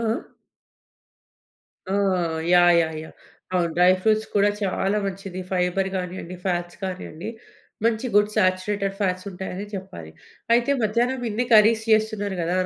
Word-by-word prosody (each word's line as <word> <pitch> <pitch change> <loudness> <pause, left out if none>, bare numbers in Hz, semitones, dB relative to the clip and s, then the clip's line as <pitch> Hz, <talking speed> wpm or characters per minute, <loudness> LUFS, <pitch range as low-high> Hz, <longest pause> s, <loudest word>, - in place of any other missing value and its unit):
ఆ! - - -3
ఆ! - - -1 1.9
ఆ! - - -1 0.6
యాహ్! 175 0 +6
యాహ్! 160 -1 -3
యాహ్! - - -12 0.4
అవును. 175 -2 +1
డ్రై 180 +1 +6
ఫ్రూట్స్ 215 +1 +2
కూడా 205 0 +4
చాలా 195 +1 0
మంచిది. 195 -1 -5
ఫైబర్ 185 +1 0
గానియండి, 180 -1 -5
ఫ్యాట్స్ 175 -1 -2
కానియండి 185 0 -5 0.6
మంచి 230 +1 +1
గుడ్ 210 0 +5
సాచురేటెడ్ 195 0 0
ఫ్యాట్స్ 185 -2 -1
ఉంటాయనే 190 +2 -6
చెప్పాలి. 85 - -8 0.4
అయితే 240 +4 +2
మధ్యాహ్నం 240 +4 0
ఇన్ని 230 +4 -1
కర్రీస్ 220 +1 +5
చేస్తున్నారు 215 -2 0
కదా! 175 +2 0
195 Hz, 135 wpm, -23 LUFS, 180-215 Hz, 1.9 s, యాహ్